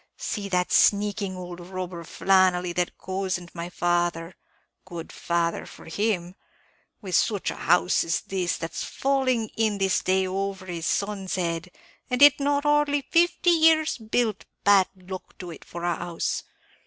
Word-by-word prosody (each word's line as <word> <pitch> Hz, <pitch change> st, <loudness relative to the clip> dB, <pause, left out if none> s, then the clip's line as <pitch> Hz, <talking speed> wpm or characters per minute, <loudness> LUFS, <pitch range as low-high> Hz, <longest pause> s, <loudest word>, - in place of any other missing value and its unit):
See 210 Hz, -, -4 dB
that 180 Hz, -1 st, 0 dB
sneaking 200 Hz, -2 st, +2 dB
ould 180 Hz, -1 st, -7 dB
robber, 180 Hz, -1 st, -6 dB
Flannelly, 180 Hz, 0 st, +2 dB
that 175 Hz, 0 st, -2 dB
cozened 185 Hz, -2 st, -4 dB
my 170 Hz, 0 st, -5 dB
father 175 Hz, -1 st, -1 dB, 0.5 s
good 170 Hz, -3 st, -8 dB
father 170 Hz, -1 st, -1 dB
for -, -, -13 dB
him 180 Hz, 0 st, -1 dB, 0.7 s
with 185 Hz, -2 st, -6 dB
such 205 Hz, +2 st, +1 dB
a -, -, -7 dB
house 180 Hz, +1 st, +2 dB
as 165 Hz, -, -1 dB
this, 185 Hz, -3 st, -2 dB
that's 165 Hz, 0 st, -5 dB
falling 260 Hz, -5 st, 0 dB
this 205 Hz, -4 st, +1 dB
day 190 Hz, 0 st, +1 dB
over 195 Hz, 0 st, -3 dB
his 170 Hz, -3 st, -4 dB
son's 200 Hz, -2 st, -1 dB
head, 170 Hz, -1 st, -2 dB, 0.4 s
and 250 Hz, +2 st, +3 dB
it 290 Hz, 0 st, +8 dB
not 285 Hz, 0 st, +1 dB
hardly 295 Hz, -1 st, +2 dB
fifty 345 Hz, +1 st, +3 dB
years 320 Hz, -3 st, +4 dB
built, 220 Hz, -1 st, -1 dB, 0.2 s
bad 200 Hz, -1 st, +5 dB
luck 185 Hz, 0 st, -9 dB
to 180 Hz, -2 st, -7 dB
it 160 Hz, -, -11 dB
for 170 Hz, 0 st, -8 dB
a 175 Hz, -1 st, +1 dB
house! 170 Hz, 0 st, -3 dB
185 Hz, 150 wpm, -25 LUFS, 175-220 Hz, 0.7 s, it